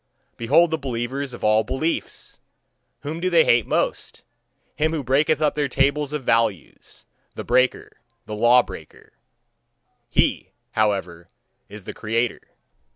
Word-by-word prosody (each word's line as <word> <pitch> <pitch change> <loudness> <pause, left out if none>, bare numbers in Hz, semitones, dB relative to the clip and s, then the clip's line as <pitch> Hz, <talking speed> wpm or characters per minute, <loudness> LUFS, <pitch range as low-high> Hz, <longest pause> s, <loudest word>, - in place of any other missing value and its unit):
Behold 150 +9 +3
the 160 - -1
believers 130 +1 -4
of 120 - -10
all 110 +1 +3
beliefs! 155 +8 -4 0.6
Whom 150 +4 -5
do 185 +2 0
they 170 -2 +4
hate 120 -2 +3
most? - - -2 0.5
Him 155 +1 0
who 155 -3 -2
breaketh 150 +4 +1
up 150 - +2
their 145 -1 -1
tables 140 +2 +1
of 150 -2 -4
values, 115 - -2 0.3
the - - -5
breaker, 130 0 0 0.3
the 110 - -7
law 120 +3 +5
breaker - - -12 1.0
he, - - 0 0.2
however, 95 -6 -1 0.4
is 105 0 -10
the - - -7
creator. 115 +2 -2
130 Hz, 135 wpm, -22 LUFS, 115-150 Hz, 1.0 s, law